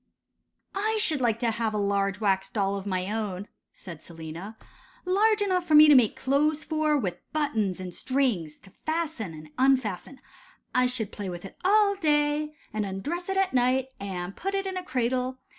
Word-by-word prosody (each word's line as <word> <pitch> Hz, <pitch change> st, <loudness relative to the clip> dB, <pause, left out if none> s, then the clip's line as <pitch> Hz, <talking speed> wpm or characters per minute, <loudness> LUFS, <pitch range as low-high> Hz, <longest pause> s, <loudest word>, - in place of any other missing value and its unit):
* -, -, -52 dB, 0.3 s
'I 435 Hz, +3 st, 0 dB
should 310 Hz, -9 st, +1 dB
like 230 Hz, -3 st, +2 dB
to 235 Hz, -2 st, +2 dB
have 220 Hz, -1 st, -2 dB
a -, -, 0 dB
large 200 Hz, -1 st, 0 dB
wax 195 Hz, -2 st, +1 dB
doll 200 Hz, -1 st, 0 dB
of 200 Hz, 0 st, -5 dB
my 185 Hz, 0 st, -2 dB
own,' 205 Hz, -3 st, -3 dB, 0.2 s
said 170 Hz, -5 st, -11 dB
Selina; 170 Hz, +6 st, -9 dB, 0.5 s
'large 410 Hz, +3 st, +3 dB
enough 365 Hz, -3 st, 0 dB
for 310 Hz, -, +4 dB
me 305 Hz, +1 st, +10 dB
to 300 Hz, -, +8 dB
make 250 Hz, -3 st, +5 dB
clothes 290 Hz, +4 st, +1 dB
for, 310 Hz, -1 st, +1 dB
with 195 Hz, -10 st, -3 dB
buttons 220 Hz, -, 0 dB
and 185 Hz, -1 st, -6 dB
strings, 235 Hz, -, -1 dB
to 195 Hz, -, -18 dB
fasten 315 Hz, -, -2 dB
and 155 Hz, 0 st, -11 dB
unfasten: 260 Hz, -3 st, +1 dB, 0.5 s
I 250 Hz, 0 st, +3 dB
should 235 Hz, -5 st, -3 dB
play 200 Hz, -3 st, -5 dB
with 175 Hz, +1 st, -7 dB
it 195 Hz, -, -10 dB
all 405 Hz, +1 st, +4 dB
day, 300 Hz, -3 st, +1 dB, 0.2 s
and 215 Hz, 0 st, -1 dB
undress 290 Hz, -, -4 dB
it 385 Hz, -, -1 dB
at 385 Hz, -4 st, +1 dB
night, 255 Hz, +1 st, +2 dB
and 190 Hz, -1 st, -5 dB
put 390 Hz, +2 st, -3 dB
it 390 Hz, 0 st, -1 dB
in 380 Hz, -1 st, -3 dB
a 370 Hz, -, -2 dB
cradle. 255 Hz, -3 st, -1 dB
250 Hz, 190 wpm, -27 LUFS, 195-310 Hz, 0.5 s, me